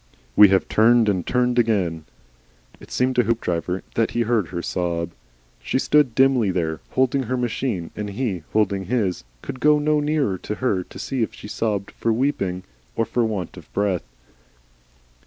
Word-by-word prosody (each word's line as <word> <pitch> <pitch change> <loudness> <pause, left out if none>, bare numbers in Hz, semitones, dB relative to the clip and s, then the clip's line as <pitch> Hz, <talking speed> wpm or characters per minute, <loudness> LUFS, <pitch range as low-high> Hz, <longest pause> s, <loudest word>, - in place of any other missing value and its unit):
"We 105 - +9
have 95 -1 +2
turned 115 +1 +4
and 95 -4 0
turned 125 -1 +2
again." 95 -9 0 0.7
It - - -14
seemed 130 0 0
to 125 - +5
Hoopdriver 90 -5 -1
that 115 - +1
he 120 - -1
heard 115 -5 +1
her 85 -1 -5
sob. 85 -2 -2 0.5
She - - -1
stood 135 -3 +3
dimly 130 -5 +4
there, 80 -4 -1
holding 130 +1 +2
her 130 - 0
machine, 120 -7 -2
and 105 -1 -4
he, 100 -4 -2
holding 100 -3 +1
his, 100 - -1 0.2
could 130 - -6
go 150 +2 +5
no 150 0 +2
nearer 145 - 0
to 105 - -4
her 105 -8 0
to - - -13
see 130 -2 -3
if 110 - -2
she - - -10
sobbed 105 -2 -2
for 115 - -1
weeping 105 -7 -1 0.3
or 115 - +1
for 120 +2 0
want 105 -6 -3
of - - -13
breath. 100 -3 0
110 Hz, 175 wpm, -22 LUFS, 95-125 Hz, 0.7 s, We